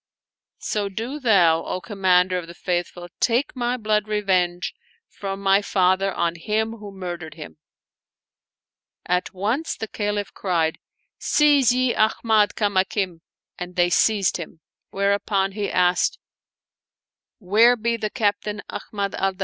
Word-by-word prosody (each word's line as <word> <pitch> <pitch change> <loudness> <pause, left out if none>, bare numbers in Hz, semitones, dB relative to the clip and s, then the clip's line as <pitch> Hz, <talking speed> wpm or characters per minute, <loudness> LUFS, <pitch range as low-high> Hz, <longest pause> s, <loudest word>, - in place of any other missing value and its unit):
So 205 -2 -2
do 230 +9 -5
thou, 175 - +4
O - - -3
Commander 185 -3 +2
of 170 - -9
the 170 - -11
Faithful, 175 0 -3
take 245 +5 +1
my 245 0 -1
blood 215 -2 0
revenge 185 -4 0 0.3
from 195 -1 -6
my 195 0 +3
father 190 0 +2
on 170 -2 0
him 215 +6 -1
who 205 -2 -9
murdered 175 -5 -7
him." 155 -1 -10 1.5
At 180 +1 0
once 225 - -1
the 220 - -4
Caliph 205 -1 -3
cried, 165 -4 -1 0.3
" - - -54 0.2
Seize 290 -5 +5
ye 255 0 +2
Ahmad 215 -1 +2
Kamakim! 190 -3 0 0.2
" - - -25
and 180 0 -6
they 175 -1 +2
seized 195 +2 +2
him; 165 -1 -9 0.3
whereupon 200 0 0
he 205 0 -3
asked, 180 0 +2 0.7
" - - -70
Where 230 +4 +6
be 235 0 -1
the 215 -2 -3
Captain 210 -2 -1
Ahmad 200 -2 -4
al 195 0 0
Danaf - - -27
200 Hz, 140 wpm, -23 LUFS, 180-215 Hz, 1.5 s, Where